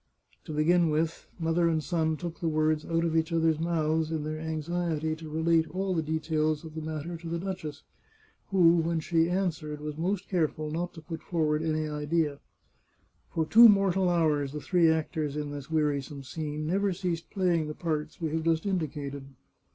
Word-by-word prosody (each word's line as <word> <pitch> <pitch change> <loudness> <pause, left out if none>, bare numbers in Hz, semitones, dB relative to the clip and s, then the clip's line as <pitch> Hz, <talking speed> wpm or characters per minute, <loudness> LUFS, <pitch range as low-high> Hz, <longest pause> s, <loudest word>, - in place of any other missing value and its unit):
To - - -6
begin 165 +3 +3
with, 155 +2 -1
mother 170 0 +2
and 160 -2 0
son 160 -2 0
took 170 +1 -6
the 170 - -1
words 155 0 +1
out 165 0 +1
of 165 -1 0
each 160 0 +1
other's 165 -2 +2
mouth 160 -1 0
in 160 -2 -2
their 155 +1 -4
anxiety 160 0 -2
to 160 -1 -9
relate 160 +1 +2
all 190 +1 -1
the 165 - +1
details 155 0 -1
of 160 - -9
the 160 - -5
matter 160 +2 -4
to 165 0 -8
the 170 - -1
duchess, 170 -5 -5 0.6
who, 175 -3 +5
when 165 0 +1
she 165 +1 +2
an 185 +1 +2
swered, 155 -2 -6
was 150 0 -6
most 190 +3 -1
careful 155 -4 -1
not 175 +3 -3
to 160 - -10
put 165 0 -6
forward 155 -3 0
any 155 -1 0
idea. 150 0 -1 0.9
For 160 - -1
two 230 +7 +9
mortal 195 -2 +3
hours 150 -5 +1
the 150 - -3
three 170 +1 +3
actors 155 -2 -1
in 150 -1 -3
this 145 -1 -7
wearisome 145 -3 -1
scene 150 +2 -4
never 195 +4 +1
ceased 175 -3 -3
playing 175 -5 +1
the 150 - -5
parts 155 -3 -3
we 160 -3 -2
have 160 +1 0
just 165 +1 +1
indicated. 145 -7 -3
160 Hz, 190 wpm, -29 LUFS, 155-170 Hz, 0.9 s, two